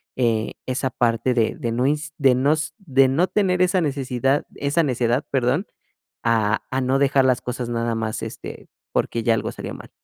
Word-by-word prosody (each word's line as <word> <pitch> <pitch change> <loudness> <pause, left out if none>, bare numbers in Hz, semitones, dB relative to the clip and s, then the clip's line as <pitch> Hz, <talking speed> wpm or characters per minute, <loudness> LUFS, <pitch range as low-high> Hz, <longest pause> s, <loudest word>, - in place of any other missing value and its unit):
eh, 115 -3 0
esa 130 +1 -1
parte 120 0 +1
de 115 -2 +2
de 115 - -3
no 125 +3 0
ins 150 +1 -1
de 135 -4 +4
no 135 +4 +3
s 155 0 -2
de 135 -8 +3
no 165 +8 +2
tener 185 -3 +1
esa 185 +1 +3
necesidad, 135 -2 0
esa 145 +4 +1
necedad, 125 -2 +1
perdón, 135 - +1 0.6
a 110 -2 +1
a 130 - 0
no 130 +1 +1
dejar 140 -1 +3
las 130 -1 +2
cosas 125 -1 -4
nada 115 -1 -1
más, 110 -1 -3
este, - - -8 0.2
porque 115 - 0
ya 115 0 +3
algo - - -2
salió - - -7
mal. - - -12
130 Hz, 190 wpm, -22 LUFS, 120-145 Hz, 0.6 s, de